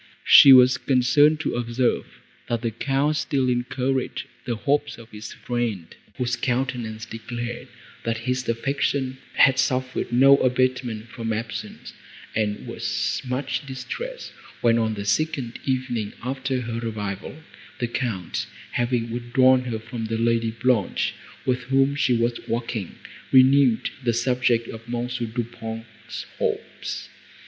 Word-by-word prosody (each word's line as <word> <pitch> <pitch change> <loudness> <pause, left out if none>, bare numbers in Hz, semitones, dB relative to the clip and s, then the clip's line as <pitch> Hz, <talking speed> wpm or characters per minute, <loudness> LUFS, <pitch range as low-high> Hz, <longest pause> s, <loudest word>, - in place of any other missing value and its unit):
She 140 - +10
was 130 0 +7
concerned 145 +4 +4
to - - -1
observe, 120 +1 0 0.4
that 115 -1 0
the 115 - 0
Count 140 +6 0
still 140 -4 0
encouraged 130 +1 -1 0.2
the 120 - 0
hopes 145 +5 0
of 115 0 -14
his 105 0 -8
friend, 115 -8 -3 0.2
whose 125 -1 0
countenance 120 -3 -2
declared, 120 +1 -6 0.4
that 115 0 -1
his 130 -1 -1
affection 130 +2 -1 0.2
had 135 0 +5
suffered 130 -1 0
no 135 +3 +7
abatement 125 -3 0
from 115 -1 -4
absence; 110 +1 -5 0.4
and 105 -1 -1
was - - -2
much 130 +2 -2
distressed, 470 - -6 0.3
when, 115 -1 +4
on 110 -1 0
the 100 -1 -5
second 135 -1 -1
evening 125 -5 -1
after 130 0 -2
her 115 -1 -4
arrival, 105 -2 -4 0.4
the 120 - -1
Count, 115 -7 -3 0.2
having 120 -1 0
withdrawn 125 +2 +3
her 120 -3 -2
from 115 +1 -6
the 115 0 -2
Lady 115 0 +2
Blanche, 115 -2 0 0.3
with 125 -1 0
whom 135 +2 +3
she 140 -3 +2
was 120 +1 0
walking, 115 -4 -3 0.4
renewed 130 -2 +5
the 120 -1 +2
subject 120 -1 +1
of 115 +1 -9
M. 120 0 -1
Du 120 -1 -3
Pont's 115 -2 -8
hopes. - - -3
120 Hz, 135 wpm, -24 LUFS, 115-130 Hz, 0.4 s, She